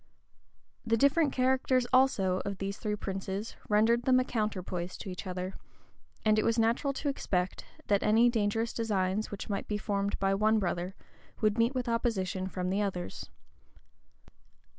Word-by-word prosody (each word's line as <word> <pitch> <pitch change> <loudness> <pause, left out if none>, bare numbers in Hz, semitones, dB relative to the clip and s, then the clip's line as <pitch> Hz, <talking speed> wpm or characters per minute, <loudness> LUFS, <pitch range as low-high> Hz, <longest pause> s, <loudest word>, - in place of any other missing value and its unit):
The 230 -1 +1
different 280 +4 +3
characters, 255 0 +2
also, 195 -8 +3
of 200 -1 -4
these 195 +1 -4
three 210 -1 -1
princes 195 +1 -4
rendered 225 +3 +3
them 255 -1 +5
a - - +2
counterpoise 185 -7 -3
to 200 - -7
each 180 -1 -7
other; 185 +1 -4 0.7
and 215 0 +4
it - - +2
was 230 0 +1
natural 230 +5 +2
to 285 - -4
expect, 185 -9 -1 0.2
that 200 -1 +2
any 225 +3 +5
dangerous 225 0 0
designs 205 -2 0
which 205 - -6
might 200 -2 -3
be 210 - -1
formed 200 -1 -1
by 195 0 +1
one 215 +2 +3
brother, 180 -1 -2 0.4
would 215 +1 +1
meet 235 +4 +2
with 250 -1 -2
opposition 195 -5 -1
from 185 -1 -3
the 200 +2 +1
others. 180 - -4
210 Hz, 160 wpm, -30 LUFS, 190-235 Hz, 0.7 s, them